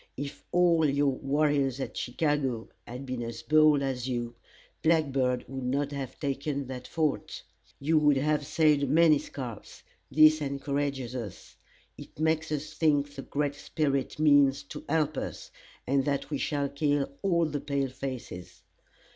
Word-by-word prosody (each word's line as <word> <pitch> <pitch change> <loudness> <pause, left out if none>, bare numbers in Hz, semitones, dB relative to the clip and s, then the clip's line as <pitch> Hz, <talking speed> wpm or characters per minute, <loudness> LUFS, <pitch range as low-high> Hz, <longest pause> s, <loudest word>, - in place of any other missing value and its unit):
If 140 +1 -6
all 170 -3 +4
your 140 0 +2
warriors 140 -1 +1
at 135 - -5
Chicago 135 -3 -1 0.2
had 125 +3 -7
been 130 -2 -4
as 115 0 -6
bold 155 -2 +5
as 130 -2 -2
you, 120 -1 -3 0.5
Black 160 -3 +3
Bird 125 -2 0
would 135 -1 -6
not 140 +3 -1
have 140 -3 -6
taken 140 0 -2
that 125 -1 -7
fort. 155 -3 -2 0.4
You 155 +3 +3
would 150 -2 +4
have 150 +2 +1
saved 150 -2 +2
many 155 0 +5
scalps. 125 -7 -8 0.3
This 155 +1 +6
encourages 140 -2 -2
us. 105 -7 -7 0.4
It - - -12
makes 160 0 +1
us 150 +1 -3
think 145 -3 +1
the 140 - -6
Great 145 +1 -2
Spirit 140 -2 -2
means 145 -3 +4
to - - -7
help 155 -2 +1
us, - - -5 0.3
and 135 +1 +2
that 140 +1 -2
we 145 - -1
shall 145 -2 -1
kill 145 0 0
all 170 -4 +2
the 145 -2 -3
pale 140 -2 -1
faces. 130 -8 -7
140 Hz, 155 wpm, -28 LUFS, 135-150 Hz, 0.5 s, This